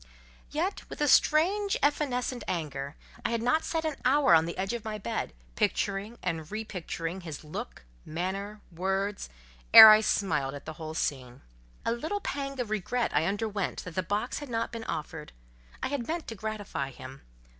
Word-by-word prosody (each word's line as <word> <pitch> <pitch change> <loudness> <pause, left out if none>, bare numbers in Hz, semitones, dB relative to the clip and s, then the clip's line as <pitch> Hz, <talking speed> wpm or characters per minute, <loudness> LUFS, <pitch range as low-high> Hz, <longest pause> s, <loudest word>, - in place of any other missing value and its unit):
Yet 345 +7 -2
with - - -8
a 295 - +2
strange 385 +9 +4
evanescent 255 -5 0
anger, 145 -4 -3 0.3
I - - 0
had 230 -1 -1
not 315 +7 +2
sat 325 -1 -2
an 310 -2 -2
hour 270 -7 +5
on 160 -1 +6
the 170 - -5
edge 195 +4 -1
of 235 -2 -4
my 215 -1 -4
bed, 205 - -3 0.2
picturing 200 +4 -1
and 160 -1 -3
repicturing 190 -4 -4
his 160 -4 -7
look, 150 - -7 0.2
manner, 195 +6 -4
words 195 +3 -2 0.5
ere 220 - +14
I 215 0 +7
smiled 150 -11 0
at 145 - -9
the 155 - -6
whole 155 0 -5
scene. 130 -5 -3 0.4
A - - +2
little 315 - -2
pang 275 -7 -4
of 235 -4 -3
regret 225 +4 0
I 150 +2 +3
underwent 205 -1 -2
that 180 - -8
the 185 - 0
box 205 +7 -2
had 290 -2 -8
not 230 -1 -1
been 230 -1 -6
offered. 155 -1 -5 0.5
I - - 0
had 275 -4 -3
meant 330 +1 -3
to 225 - -6
gratify 205 -10 -4
him. 130 +1 -11
210 Hz, 175 wpm, -29 LUFS, 165-250 Hz, 0.5 s, ere